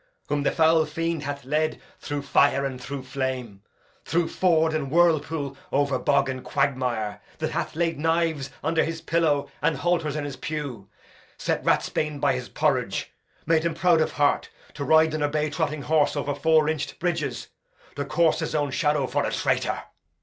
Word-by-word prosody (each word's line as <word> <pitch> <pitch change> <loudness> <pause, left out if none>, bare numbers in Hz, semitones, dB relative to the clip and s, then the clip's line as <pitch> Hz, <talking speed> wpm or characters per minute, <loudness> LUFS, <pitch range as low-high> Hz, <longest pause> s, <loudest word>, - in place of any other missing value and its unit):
whom 145 - +1
the 140 - +2
foul 160 0 +4
fiend 165 +1 -2
hath 140 -1 -5
led 155 +3 0 0.2
through 145 -1 -4
fire 140 -1 +3
and 130 -2 -4
through 135 +1 -5
flame, 130 -6 -4 0.4
through 170 0 +1
ford 160 -3 +2
and 150 -3 -2
whirlpool, 155 -3 +2 0.2
o'er 140 -2 +1
bog 140 -1 +2
and 130 -1 -4
quagmire; 125 -6 -1 0.2
that - - -2
hath - - -3
laid 165 -2 0
knives 160 -3 0
under 160 +2 +2
his 165 0 -3
pillow 160 -4 +1
and 155 - +1
halters 170 -2 0
in 150 -1 -2
his 140 -2 -6
pew, 140 -10 -5 0.5
set - - -1
ratsbane 150 -2 0
by 140 -1 +3
his 125 -1 -5
porridge, - - 0 0.3
made 165 -1 +3
him 170 -1 -1
proud 170 -1 +4
of - - 0
heart, 145 0 +1 0.2
to 145 - -5
ride 160 +2 +4
on 155 - -2
a 145 - +2
bay 150 0 -1
trotting 145 0 -2
horse 155 -1 +2
over 145 0 -1
four 155 +2 +3
inch'd 155 -2 -2
bridges, 170 -4 -2 0.5
to 145 - -2
course 165 +1 +2
his - - -3
own 145 -2 0
shadow 150 -3 +1
for - - 0
a - - -1
traitor. - - 0
150 Hz, 180 wpm, -25 LUFS, 140-160 Hz, 0.5 s, foul